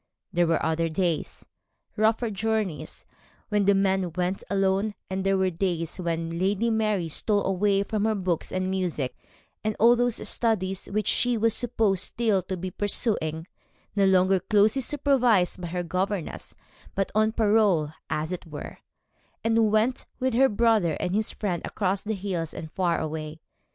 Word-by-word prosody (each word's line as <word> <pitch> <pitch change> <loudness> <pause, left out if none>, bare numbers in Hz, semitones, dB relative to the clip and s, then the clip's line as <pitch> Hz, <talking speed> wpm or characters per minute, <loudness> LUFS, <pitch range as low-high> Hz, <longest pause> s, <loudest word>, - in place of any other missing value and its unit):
There 175 -1 +3
were 165 -1 +1
other 165 +1 0
days 170 0 -2 0.5
rougher 220 +1 +1
journeys 210 -4 -2 0.4
when 210 -2 +2
the 200 0 +5
men 190 -2 +1
went 180 +2 -2
alone, 195 +1 +1 0.2
and 190 0 -2
there 195 0 +2
were 190 -1 +1
days 170 -2 -2
when 165 -1 -2
Lady 205 +5 +1
Mary 215 -5 0
stole 205 +6 0
away 195 +1 +2
from 210 0 -1
her 220 -1 +1
books 185 -4 -2
and 185 0 -1
music, 180 -8 -2 0.5
and 215 0 -1
all 235 +2 +6
those 245 -1 0
studies 195 -5 0
which 210 0 -1
she 245 +2 +2
was 225 0 +2
supposed 220 -6 +1
still 220 -5 0
to 185 +1 -5
be 185 +1 -5
pursuing 170 -6 0 0.5
no 200 -1 +3
longer 190 0 +4
closely 210 +6 +3
supervised 250 -10 +2
by 175 - -4
her 175 +1 -3
governess, 185 +1 -3 0.4
but 195 0 -1
on 215 +1 +3
parole, 210 -8 +3 0.2
as 155 +2 -2
it 180 -2 -5
were 150 -2 -8 0.6
and 225 -1 +3
went 225 +4 +1
with 260 -1 0
her 265 +3 +5
brother 215 -6 +2
and 180 - -2
his 215 +1 0
friend 180 -5 -2
across 195 -1 -1
the 220 0 -3
hills 180 -5 -4
and 160 - -7
far 175 -2 0
away. 155 0 -5
195 Hz, 160 wpm, -26 LUFS, 175-215 Hz, 0.6 s, all